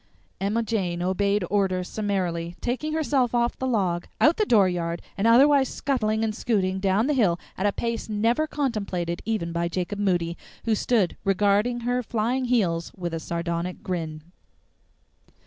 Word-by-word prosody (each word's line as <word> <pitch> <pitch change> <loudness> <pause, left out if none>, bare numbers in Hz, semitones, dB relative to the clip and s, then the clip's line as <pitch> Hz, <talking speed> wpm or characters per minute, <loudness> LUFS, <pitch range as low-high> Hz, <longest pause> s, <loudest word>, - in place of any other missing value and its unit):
Emma 210 +4 0
Jane 185 -6 -1
obeyed 200 +1 +1
orders 185 -3 +1
summarily, 180 -5 -2
taking 280 +6 -2
herself 275 -6 +1
off 235 0 +1
the 260 - -1
log, 185 -8 0
out 310 +3 +5
the 430 - +1
dooryard, 180 -5 +2 0.2
and 200 +3 +1
otherwise 270 +3 +6
scuttling 220 -5 0
and 220 -1 0
scooting 190 -4 0
down 195 +3 +2
the 300 - +1
hill 195 -10 +2 0.2
at 195 - 0
a - - +2
pace 230 +2 -3
never 230 +8 +1
contemplated 200 - -2
even 210 -6 -1
by 170 0 -1
Jacob 185 +3 -3
Moody, 175 -4 0 0.3
who 225 - +2
stood 215 -3 +1
regarding 205 +5 +2
her 245 +1 0
flying 240 +3 -1
heels 185 -9 +1
with 175 -2 -4
a 165 - -2
sardonic 170 +2 -3
grin. 160 -4 -4
205 Hz, 155 wpm, -25 LUFS, 180-235 Hz, 0.3 s, otherwise